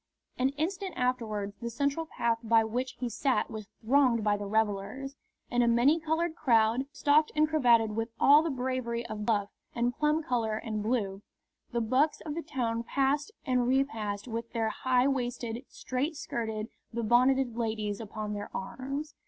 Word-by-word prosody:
An 260 Hz, +1 st, +3 dB
instant 370 Hz, +4 st, -2 dB
afterwards 220 Hz, -5 st, -1 dB
the 235 Hz, -, -3 dB
central 280 Hz, +6 st, -1 dB
path 235 Hz, -5 st, 0 dB
by 225 Hz, -1 st, +4 dB
which 245 Hz, +4 st, -2 dB
he 250 Hz, -, -4 dB
sat 240 Hz, 0 st, 0 dB
was 215 Hz, -2 st, -6 dB, 0.2 s
thronged 250 Hz, -3 st, +4 dB
by 210 Hz, -1 st, +3 dB
the 205 Hz, 0 st, -5 dB
revellers. 220 Hz, +6 st, -1 dB, 0.4 s
In 245 Hz, -1 st, +3 dB
a 240 Hz, -, +3 dB
many 245 Hz, +7 st, +4 dB
coloured 320 Hz, +1 st, -1 dB
crowd, 235 Hz, -2 st, +3 dB
stocked 300 Hz, +2 st, +3 dB
and 305 Hz, 0 st, +4 dB
cravated 235 Hz, -8 st, +3 dB
with 225 Hz, +1 st, -1 dB
all 290 Hz, +2 st, +7 dB
the 330 Hz, -, -1 dB
bravery 250 Hz, -3 st, -2 dB
of 210 Hz, -1 st, -5 dB
buff 205 Hz, -3 st, +1 dB, 0.3 s
and 240 Hz, 0 st, 0 dB
plum 300 Hz, +1 st, +1 dB
colour 230 Hz, -5 st, 0 dB
and 220 Hz, -2 st, -3 dB
blue, 205 Hz, -4 st, -1 dB, 0.5 s
the 235 Hz, -1 st, 0 dB
bucks 260 Hz, +7 st, +2 dB
of 305 Hz, -, -5 dB
the 335 Hz, -, -3 dB
town 240 Hz, -7 st, -2 dB
passed 275 Hz, -, 0 dB, 0.2 s
and 250 Hz, -2 st, +2 dB
repassed 225 Hz, -6 st, 0 dB
with 230 Hz, 0 st, -4 dB
their 225 Hz, -1 st, 0 dB
high 255 Hz, +2 st, +2 dB
waisted, 245 Hz, -2 st, -2 dB
straight 275 Hz, +6 st, -3 dB
skirted, 220 Hz, -5 st, -4 dB, 0.2 s
be 235 Hz, 0 st, -3 dB
bonneted 250 Hz, +2 st, +3 dB
ladies 220 Hz, -3 st, -2 dB
upon 215 Hz, -1 st, -5 dB
their 205 Hz, 0 st, -5 dB
arms. 275 Hz, +9 st, -5 dB
240 Hz, 170 wpm, -30 LUFS, 220-275 Hz, 0.5 s, all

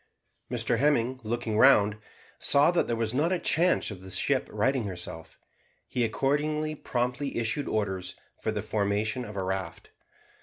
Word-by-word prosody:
Mr 120 Hz, -1 st, 0 dB
Hemming, 130 Hz, -3 st, +2 dB
looking 115 Hz, -1 st, -2 dB
round, 105 Hz, -6 st, +5 dB, 0.4 s
saw 145 Hz, +4 st, +4 dB
that 175 Hz, -, +1 dB
there 120 Hz, -, 0 dB
was 115 Hz, 0 st, -1 dB
not 150 Hz, +7 st, +1 dB
a 185 Hz, -, +2 dB
chance 175 Hz, -5 st, +2 dB
of 95 Hz, -3 st, -9 dB
the 95 Hz, -, -10 dB
ship 90 Hz, -, +1 dB
righting 130 Hz, -3 st, +1 dB
herself. 85 Hz, -3 st, -7 dB, 0.5 s
He 125 Hz, -, -1 dB
accordingly 150 Hz, +6 st, 0 dB
promptly 125 Hz, 0 st, -2 dB
issued 120 Hz, +5 st, -1 dB
orders 95 Hz, -4 st, -2 dB, 0.3 s
for -, -, -1 dB
the -, -, -3 dB
formation 105 Hz, +3 st, -1 dB
of 105 Hz, -3 st, -8 dB
a 95 Hz, -, -2 dB
raft. 95 Hz, -3 st, -4 dB
115 Hz, 155 wpm, -28 LUFS, 100-140 Hz, 0.5 s, round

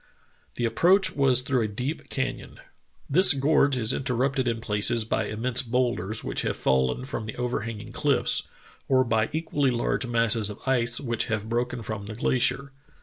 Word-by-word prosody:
The 120 Hz, -, -1 dB
approach 185 Hz, -, +3 dB
was 130 Hz, -3 st, +4 dB
through 130 Hz, -2 st, 0 dB
a 110 Hz, -, 0 dB
deep 125 Hz, +9 st, -5 dB
can 130 Hz, -2 st, -2 dB
yon. -, -, -14 dB, 0.5 s
"This 185 Hz, +4 st, +6 dB
gorge 140 Hz, -1 st, +2 dB
is 115 Hz, +1 st, +3 dB
interrupted 130 Hz, 0 st, -1 dB
in 115 Hz, -1 st, -1 dB
places 110 Hz, +1 st, +1 dB
by -, -, -1 dB
immense 120 Hz, +3 st, 0 dB
bowlders 120 Hz, -4 st, -1 dB
which -, -, -2 dB
have -, -, -2 dB
fallen 65 Hz, -, 0 dB
from 130 Hz, -5 st, -5 dB
the 110 Hz, -, -6 dB
overhanging 115 Hz, -3 st, -4 dB
cliffs, 145 Hz, -3 st, +1 dB, 0.5 s
or 130 Hz, -1 st, +3 dB
by 110 Hz, -2 st, 0 dB
equally 150 Hz, -3 st, 0 dB
large 125 Hz, +1 st, -1 dB
masses 115 Hz, -2 st, +2 dB
of 105 Hz, -, -7 dB
ice 120 Hz, -3 st, +2 dB
which 120 Hz, -4 st, -2 dB
have 110 Hz, 0 st, -3 dB
broken 120 Hz, 0 st, -2 dB
from 105 Hz, -2 st, -6 dB
the 110 Hz, -, -7 dB
glacier. 130 Hz, +3 st, 0 dB
120 Hz, 170 wpm, -25 LUFS, 110-135 Hz, 0.5 s, This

